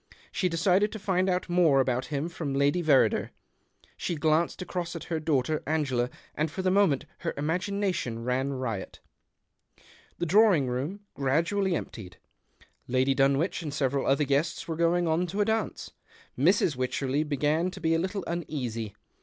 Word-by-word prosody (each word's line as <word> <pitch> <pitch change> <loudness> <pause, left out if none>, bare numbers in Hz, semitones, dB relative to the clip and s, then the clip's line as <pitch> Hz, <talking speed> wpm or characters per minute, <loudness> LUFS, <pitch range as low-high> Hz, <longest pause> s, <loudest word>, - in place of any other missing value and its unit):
She 185 - 0
decided 185 +5 +2
to - - -4
find 190 -2 0
out 180 0 0
more 175 -6 +4
about 130 -1 0
him 145 +1 -2
from 155 -5 -4
Lady 145 +5 +2
Verrider. 150 -5 +3 0.7
She 175 - -3
glanced 155 +2 +1
across 180 -2 -4
at 165 - -5
her 160 - 0
daughter 155 -1 0
Angela, 135 -6 0 0.2
and 155 +1 -1
for 175 +5 -5
the 185 - +2
moment 190 -9 +3
her - - -3
imagination 175 - -1
ran 130 +3 0
riot. 115 -7 -4 1.2
The - - -1
drawing 190 -4 +5
room 140 +11 -3
gradually 170 +8 +1
emptied. 95 - -7 0.7
Lady 130 +2 +2
Dunwich 140 +7 +2
and 155 -3 -4
several 140 -1 0
other 140 +2 +3
guests 145 +4 0
were 165 - -2
going 170 +1 +2
on 165 +3 +1
to 195 +5 -4
a - - +3
dance. 220 -1 -2 0.4
Mrs. 165 +2 +3
Wycherley 130 +2 -1
began 150 +4 0
to - - -9
be 160 -1 +1
a 165 - +2
little 190 +2 -2
uneasy. 125 - -4
155 Hz, 160 wpm, -28 LUFS, 135-180 Hz, 1.2 s, drawing